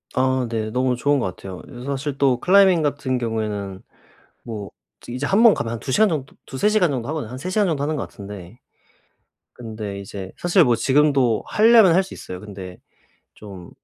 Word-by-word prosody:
아 130 -1 +1
네 110 -2 -2
너무 125 +1 +1
좋은 145 +2 +1
것 110 - -1
같아요. 95 -2 -9
그래서 125 -1 -11
사실 140 +1 -3
또 135 -3 +2
클라이밍 190 -2 +5
같은 140 -3 -1
경우에는 105 -5 -3 0.6
뭐 105 -4 -7 0.4
이제 125 +4 -4
1 195 +9 +2
번 230 -3 +7
가면 115 - -3
한 115 - -5
2 130 - -5
시간 215 +9 +4
정도, 145 -6 -4
2-3 135 +11 0
시간 200 -7 +2
정도 125 -4 -3
하거든요. 150 -8 -4
한 130 - -6
3 180 - -5
시간 205 +1 +1
정도 155 -5 -1
하는 150 +2 -1
것 145 - -3
같은데 100 0 -11 0.9
근데 110 -4 -7
이제 95 -1 -8
사실 175 +1 +3
뭐 120 -5 +3
지금도 135 -3 +2
하려면 220 -4 +6
할 190 - +4
수 190 - -11
있어요. 90 - -8
근데 95 -3 -9 0.6
좀 95 -4 -11
130 Hz, 335 characters per minute, -22 LUFS, 110-155 Hz, 0.9 s, 번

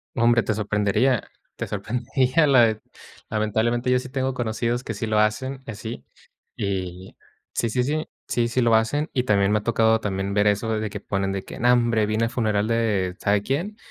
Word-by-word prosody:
No 115 - +1
hombre, 120 -1 +4
te 110 - 0
sorprendería, 105 +4 +1 0.3
te - - -4
sorprendería 125 +8 0
la 135 -4 +6
de 110 -1 -1 0.5
lamentablemente, 110 +3 0
yo 125 - +4
sí 130 0 -5
tengo 130 -1 -2
conocidos 120 +1 -1
que 110 - -4
sí 110 +1 -4
lo 110 - +1
hacen, 130 +6 0
así, 115 0 -7 0.5
y 95 -2 -4 0.4
sí, 115 - 0
sí, 125 +3 0
sí. 155 +4 -2 0.2
Sí, 120 -1 +1
sí 125 +2 0
lo 115 -1 +3
hacen. 130 +8 +2
Y 125 - +2
también 100 -3 +3
me 105 - +3
ha - - -10
tocado 110 0 +3
también 100 -1 -2
ver 105 0 +3
eso 110 +2 +1
de 110 0 -3
que 105 0 -6
ponen 95 -1 -2
de 95 -1 -3
que: - - -9
"No, 120 +1 +4
hombre, 115 -3 +2
vine 110 +2 0
al 115 - 0
funeral 110 -4 0
de 105 -6 0
sabe 100 0 +1
quién 170 - -2
110 Hz, 205 wpm, -24 LUFS, 105-125 Hz, 0.5 s, la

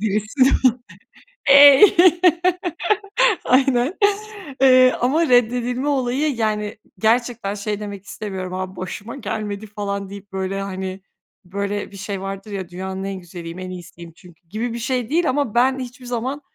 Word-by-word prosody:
birisi 215 +5 -2 1.1
eee, 280 +1 +9 1.6
aynen. 260 +3 +2 0.7
Eee, 255 -1 +6
ama 300 +5 +2
reddedilme 245 +2 +2
olayı, 270 +1 0
yani, 215 -2 -2 0.2
gerçekten 225 -2 0
şey 205 0 -4
demek 200 -2 -7
istemiyorum: 190 -4 -6
"abi 185 0 -5
başıma 205 +6 -7
gelmedi 215 -3 -5
falan" 200 -1 -4
deyip, 200 0 -11
böyle, 190 +1 -3
hani, 190 -1 -5 0.4
böyle 200 +2 -4
bir 195 - -11
şey 195 -1 -5
vardır 195 +2 -6
ya, 190 -3 -5
dünyanın 190 +1 -6
en 195 0 -4
güzeliyim, 175 0 -9
en 185 0 -6
iyisiyim, 175 -2 -10
çünkü 175 -2 -19
gibi 230 +3 -3
bir 235 - -5
şey 250 0 -2
değil 335 +2 +1
ama 265 -4 -1
ben 260 +2 +3
hiçbir 250 0 -8
zaman, 250 +4 -3
210 Hz, 140 wpm, -21 LUFS, 195-250 Hz, 1.6 s, eee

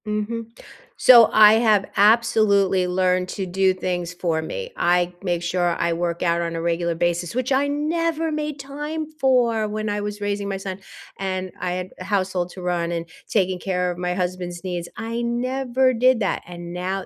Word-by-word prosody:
Mhm. 215 +2 -3 0.5
So 235 -3 +8
I 215 0 +8
have 215 -3 +3
absolutely 200 -3 +4
learned 180 0 +1
to 195 - -4
do 190 +1 +2
things 180 -1 -3
for 170 -3 -1
me. 480 - -6
I 175 0 +1
make 175 -3 -1
sure 175 0 0
I 170 0 +1
work 170 0 -2
out 170 -1 +1
on 170 0 -3
a 165 - -3
regular 170 0 0
basis, 175 0 -1
which 255 +2 -2
I 270 +2 +2
never 320 +2 -1
made 300 -1 -3
time 295 +3 -5
for 240 -5 +2
when 215 0 -3
I 205 0 -2
was 205 0 -5
raising 205 0 -2
my 195 -1 -2
son, 190 0 -6 0.4
and, 185 -1 -3
I 180 - -2
had 180 0 -4
a - - -6
household 185 -3 -1
to 185 - -10
run, 175 -1 -1
and 170 -1 -3 0.2
taking 185 -3 0
care 180 -1 -1
of 175 - -7
my 180 0 -2
husband's 180 -1 -4
needs. 175 -2 -4
I 230 +1 -4
never 255 +2 0
did 250 +1 +3
that, 200 - -1
and 175 -1 -8
now 185 +2 -3
190 Hz, 185 wpm, -22 LUFS, 180-230 Hz, 0.5 s, So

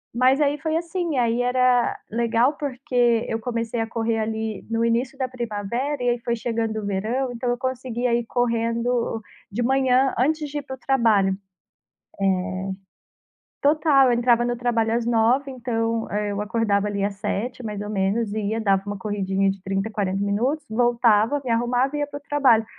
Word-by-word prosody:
mas 260 +4 +4
aí 290 0 +2
foi 315 +2 -2
assim. 335 -2 -2
Aí 235 -1 +2
era 250 0 +2
legal 235 +4 +2
porque 245 -4 +1
eu 225 - -1
comecei 230 0 -3
a 225 - -2
correr 230 -1 -1
ali 220 -1 -3
no 230 0 0
início 235 +3 0
da 260 -1 -1
primavera, 240 +3 -3
e 245 - +2
aí 240 - 0
foi 235 0 -1
chegando 225 -1 -2
o - - -6
verão, 225 +7 -1
então 245 +1 -3
eu 245 - 0
conseguia 250 -2 -2
ir 240 - -1
correndo 235 -1 0 0.3
de 215 +5 -2
manhã 265 +1 +3
antes 300 +4 +1
de 290 +1 -3
ir - - -5
pro 265 -1 -7
trabalho. 230 -7 +3
É. - - -1 2.3
Total, 290 -2 +4
eu 245 - +3
entrava 240 0 +3
no 240 0 -1
trabalho 230 -2 0
às 235 0 0
9h 240 +4 +2
então, 230 -2 -2
eh, 210 0 -1
eu 200 - -3
acordava 210 -1 +1
ali 200 -1 -2
às 200 0 -1
7h 225 +5 -3
mais 210 -2 -4
ou 205 - -5
menos, 205 +2 0
e 220 - -1
ia, 225 +1 -1
dava 195 -2 +2
uma 205 0 -4
corridinha 195 -1 0
de 195 0 -9
30 195 +2 -1
a - - -11
40 200 -2 -1
minutos, 245 +10 0
voltava, 235 +2 +3
me 255 - -5
arrumava 245 +4 +1
e - - -2
ia 290 - -1
pro 285 0 -7
trabalho. 255 -7 +4
235 Hz, 185 wpm, -23 LUFS, 220-255 Hz, 2.3 s, mas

